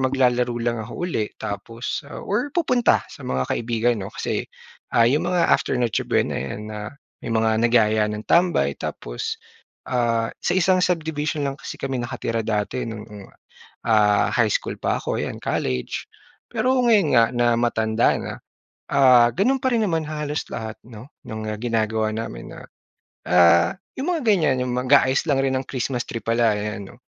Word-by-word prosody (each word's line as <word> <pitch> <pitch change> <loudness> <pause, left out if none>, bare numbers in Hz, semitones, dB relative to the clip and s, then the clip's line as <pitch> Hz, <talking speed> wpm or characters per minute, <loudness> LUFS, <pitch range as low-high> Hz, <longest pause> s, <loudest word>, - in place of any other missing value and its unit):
maglalaro 125 -2 +1
lang 120 -1 0
ako 115 +10 -5
uli 110 -12 -1
tapos, 115 +4 -5
ah, - - -8
or 240 +8 -1
pupunta 255 -8 +2
sa - - -13
mga 65 0 -1
kaibigan, 120 0 0
'no. 95 - -5
Kasi, - - -2 0.5
ah, 115 - +6
'yong 140 +6 +2
mga 175 -2 +2
after - - +2
Noche 120 -4 0
Buena - - +1
'yan, 85 +11 -5
ah, 105 0 -6 0.3
may - - -4
mga 110 0 +2
nagyaya 110 -2 +3
ng 105 0 -5
tambay. 175 0 +3
Tapos, 450 +1 -4 0.5
ah, 115 -3 +1
sa - - 0
isang 185 0 +3
subdivision 155 -4 -1
lang 135 0 -3
kasi - - -7
kami 135 -2 -3
nakatira 120 -1 -3
dati 105 +3 -1
no'ng, 105 -3 -9 0.6
ah, 105 -2 +4
high - - +3
school - - -1
pa - - 0
ako, - - -2
'yan - - -4
college. 65 -1 -2 0.4
Pero 260 +1 +1
ngayon 210 -8 +4
nga 115 - +7
na 120 0 +2
matanda 110 -1 +2
na, - - -5 0.6
ah, 125 -3 +6
gano'n 250 - +1
pa 260 - +2
rin 230 -2 +2
naman 165 -2 0
halos 150 -1 -3
lahat, 110 -1 -5
'no, 115 +1 -12 0.2
no'ng 110 0 -6
ginagawa 110 -2 0
namin 110 - -6
na, - - -10 0.7
ah, 85 -1 +5 0.2
'yong 275 - -2
mga 310 - -4
ganyan, 175 - +3
'yong 125 - -3
mag-aayos 130 +3 +3
lang 135 -2 +2
rin 135 - +1
ng 135 - -9
Christmas 125 -1 -3
tree 115 -2 -5
pala, 115 -2 +2
ayan, 105 -1 -5
'no. 120 - -15
120 Hz, 170 wpm, -23 LUFS, 110-150 Hz, 0.7 s, nga